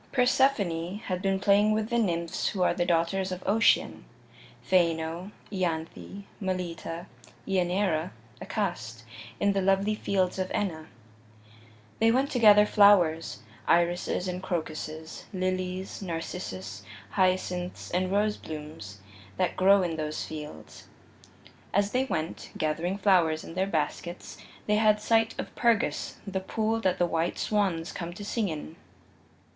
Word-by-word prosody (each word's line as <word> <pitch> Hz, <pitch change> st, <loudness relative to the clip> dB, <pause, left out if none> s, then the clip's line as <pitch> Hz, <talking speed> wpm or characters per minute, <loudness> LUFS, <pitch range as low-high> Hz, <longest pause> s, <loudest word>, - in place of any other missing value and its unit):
II -, -, -28 dB
Persephone 205 Hz, -9 st, +2 dB
had 185 Hz, -4 st, -4 dB
been 195 Hz, -1 st, +1 dB
playing 205 Hz, +2 st, +4 dB
with 215 Hz, 0 st, -1 dB
the 235 Hz, -, +2 dB
nymphs 170 Hz, -6 st, -1 dB
who 190 Hz, -3 st, 0 dB
are -, -, +3 dB
the 175 Hz, -1 st, -1 dB
daughters 180 Hz, +3 st, +1 dB
of 185 Hz, 0 st, -5 dB
Ocean 220 Hz, +3 st, +3 dB, 0.6 s
Phaeno, 170 Hz, 0 st, +1 dB, 0.2 s
Ianthe, 180 Hz, +1 st, -3 dB, 0.2 s
Melita, 175 Hz, -3 st, -4 dB, 0.4 s
Ianeira, 180 Hz, -2 st, +1 dB, 0.3 s
Acast 145 Hz, -, -3 dB, 0.4 s
in 200 Hz, 0 st, +3 dB
the 195 Hz, -, +1 dB
lovely 195 Hz, +2 st, +2 dB
fields 190 Hz, -3 st, 0 dB
of 185 Hz, 0 st, -1 dB
Enna. 160 Hz, -6 st, -2 dB, 1.1 s
They 225 Hz, -, +5 dB
went 265 Hz, +4 st, +2 dB
to 250 Hz, -, 0 dB
gather 210 Hz, -2 st, +8 dB
flowers 175 Hz, -, +4 dB, 0.2 s
irises 175 Hz, +2 st, +2 dB
and 180 Hz, 0 st, -3 dB
crocuses, 160 Hz, -3 st, -5 dB
lilies, 185 Hz, 0 st, -3 dB
narcissus, 165 Hz, -, -5 dB, 0.3 s
hyacinths 185 Hz, -1 st, 0 dB
and 185 Hz, +1 st, 0 dB
roseblooms 155 Hz, -, -3 dB, 0.4 s
that -, -, 0 dB
grow 195 Hz, +1 st, +5 dB
in 165 Hz, -2 st, -2 dB
those 155 Hz, 0 st, -3 dB
fields. 150 Hz, -, -9 dB, 0.9 s
As 200 Hz, +1 st, +2 dB
they 255 Hz, +1 st, +1 dB
went, 160 Hz, -10 st, -4 dB
gathering 165 Hz, +5 st, -1 dB
flowers 175 Hz, -6 st, +3 dB
in -, -, -9 dB
their 190 Hz, +2 st, 0 dB
baskets, 170 Hz, +1 st, -3 dB, 0.3 s
they 210 Hz, 0 st, +2 dB
had 215 Hz, -1 st, +4 dB
sight 225 Hz, +1 st, +2 dB
of -, -, -5 dB
Pergus, 235 Hz, -3 st, +1 dB
the 195 Hz, -1 st, -2 dB
pool 220 Hz, +4 st, -1 dB
that 185 Hz, -3 st, +1 dB
the 175 Hz, -, +3 dB
white 165 Hz, 0 st, -1 dB
swans 190 Hz, -6 st, 0 dB
come 170 Hz, -1 st, -5 dB
to 205 Hz, +3 st, -8 dB
sing 210 Hz, -1 st, -1 dB
in. 155 Hz, +1 st, -6 dB
185 Hz, 135 wpm, -28 LUFS, 165-205 Hz, 1.1 s, gather